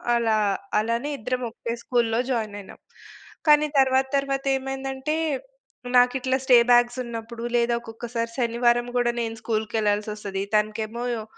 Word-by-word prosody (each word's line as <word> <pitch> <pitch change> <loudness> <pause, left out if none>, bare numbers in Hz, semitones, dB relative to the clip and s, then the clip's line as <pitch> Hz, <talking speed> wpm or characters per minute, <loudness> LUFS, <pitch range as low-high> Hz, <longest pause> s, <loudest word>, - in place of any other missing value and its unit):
అలా 225 -2 +2 0.4
అలానే 230 +6 -1
ఇద్దరం 250 +3 -2
ఒకే 230 0 -5
స్కూల్‌లో 235 -2 +1
జాయిన్ 215 -4 -2
అయినాం. 195 - -14 0.7
కానీ 300 0 +6
తర్వాత 265 0 +3
తర్వాతేమైందంటే 270 +1 -2 0.8
నాకిట్లా 260 +1 +3
స్టే 250 -2 +7
బ్యాక్సున్నప్పుడు 240 -1 +1
లేదా 235 0 +2
ఒక్కొక్కసారి 230 0 -5
శనివారం 240 0 +2
కూడా 240 -1 +2
నేను 225 -1 -3
స్కూల్‌కెళ్ళాల్సొస్తది. 210 -2 -1
తనకేమో 215 +2 -1 0.2
ఒ - - -7
235 Hz, 110 wpm, -24 LUFS, 225-260 Hz, 0.8 s, స్టే